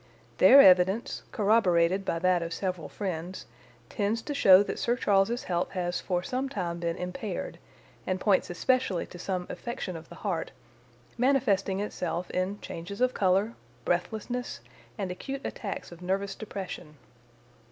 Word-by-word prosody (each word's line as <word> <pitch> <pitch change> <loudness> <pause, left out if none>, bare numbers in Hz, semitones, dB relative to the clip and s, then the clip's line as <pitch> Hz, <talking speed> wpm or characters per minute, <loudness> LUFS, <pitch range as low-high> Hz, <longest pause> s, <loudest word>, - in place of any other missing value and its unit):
Their 275 - +9
evidence, 190 +3 +4
corroborated 195 -4 +3
by 165 - 0
that 180 0 +2
of 165 0 -4
several 180 -6 -3
friends, 185 -2 -5 0.4
tends 220 +2 -1
to 295 - -4
show 195 -8 +7
that - - -5
Sir 240 - +1
Charles's 210 +1 +2
health 175 -1 -1
has 175 -2 -2
for 180 -2 -1
some 260 +6 -2
time 175 -8 -3
been 170 0 -2
impaired, 185 +2 -5 0.5
and 185 0 0
points 195 0 +2
especially 190 0 +1
to 175 - -12
some 180 -1 -2
affection 235 -6 -5
of 160 0 -10
the - - -10
heart, - - -2 0.7
manifesting 200 -7 +2
itself 180 -3 -3
in 185 +3 -1
changes 180 +5 -7
of 255 0 +2
colour, 195 +4 +2 0.3
breathlessness, 220 +7 -2 0.4
and 195 -3 -3
acute 270 +9 -5
attacks 200 -4 -5
of 175 0 -12
nervous 195 +2 -1
depression. 190 -7 -7
190 Hz, 145 wpm, -28 LUFS, 180-220 Hz, 0.7 s, Their